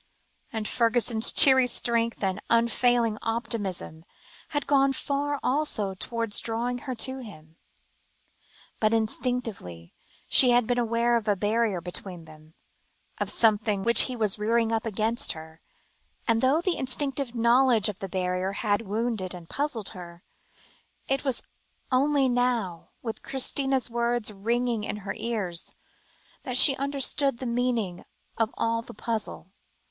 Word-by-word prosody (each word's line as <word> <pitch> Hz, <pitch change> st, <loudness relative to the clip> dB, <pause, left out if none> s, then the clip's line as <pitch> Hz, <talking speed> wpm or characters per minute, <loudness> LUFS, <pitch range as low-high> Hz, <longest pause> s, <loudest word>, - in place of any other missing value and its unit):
And 220 Hz, -2 st, -3 dB
Fergusson's 235 Hz, -1 st, +2 dB
cheery 265 Hz, -4 st, +7 dB
strength 230 Hz, -2 st, -1 dB
and 190 Hz, +1 st, -1 dB
unfailing 235 Hz, -1 st, +2 dB
optimism, 205 Hz, -8 st, -3 dB, 0.4 s
had 290 Hz, -1 st, -3 dB
gone 275 Hz, -1 st, +3 dB
far 285 Hz, +1 st, -2 dB
also 250 Hz, -8 st, -1 dB
towards 230 Hz, +2 st, -1 dB
drawing 240 Hz, +2 st, -3 dB
her 255 Hz, -, -2 dB
to 260 Hz, +3 st, 0 dB
him. 160 Hz, -10 st, -12 dB, 1.2 s
But 215 Hz, +1 st, +2 dB
instinctively 220 Hz, -, -3 dB, 0.3 s
she 255 Hz, -, +7 dB
had 245 Hz, -1 st, +4 dB
been 245 Hz, +2 st, 0 dB
aware 235 Hz, 0 st, +1 dB
of 225 Hz, -2 st, -5 dB
a 205 Hz, -, +3 dB
barrier 210 Hz, -1 st, 0 dB
between 180 Hz, -1 st, -5 dB
them, 155 Hz, 0 st, -17 dB, 0.6 s
of -, -, -2 dB
something 210 Hz, -3 st, +2 dB
which 235 Hz, +2 st, +6 dB
he 255 Hz, -, -4 dB
was 215 Hz, -3 st, +2 dB
rearing 225 Hz, +1 st, +1 dB
up 225 Hz, 0 st, -1 dB
against 220 Hz, +2 st, 0 dB
her, 160 Hz, 0 st, -12 dB, 0.7 s
and 230 Hz, -1 st, +2 dB
though 275 Hz, +5 st, +3 dB
the 360 Hz, 0 st, -1 dB
instinctive 265 Hz, -1 st, -2 dB
knowledge 235 Hz, -1 st, +4 dB
of 210 Hz, -1 st, -5 dB
the 195 Hz, -, -6 dB
barrier 185 Hz, +1 st, -2 dB
had 205 Hz, 0 st, 0 dB
wounded 215 Hz, -3 st, -2 dB
and 170 Hz, -2 st, -11 dB
puzzled 275 Hz, -8 st, -3 dB
her, 175 Hz, -1 st, -11 dB, 0.8 s
it 270 Hz, 0 st, -1 dB
was 265 Hz, -4 st, -2 dB, 0.5 s
only 275 Hz, +1 st, +3 dB
now, 245 Hz, -8 st, -1 dB
with 225 Hz, -2 st, -5 dB
Christina's 270 Hz, 0 st, 0 dB
words 235 Hz, -2 st, -1 dB
ringing 230 Hz, +2 st, -1 dB
in 210 Hz, -, -4 dB
her 200 Hz, -, -3 dB
ears, 200 Hz, -8 st, -4 dB, 0.7 s
that 255 Hz, -1 st, 0 dB
she 270 Hz, +1 st, +9 dB
understood 275 Hz, -1 st, 0 dB
the 255 Hz, -, -7 dB
meaning 235 Hz, -7 st, -1 dB, 0.3 s
of 225 Hz, -1 st, 0 dB
all 230 Hz, 0 st, 0 dB
the 230 Hz, -, -12 dB
puzzle. 215 Hz, -4 st, -4 dB
230 Hz, 140 wpm, -26 LUFS, 205-250 Hz, 1.2 s, she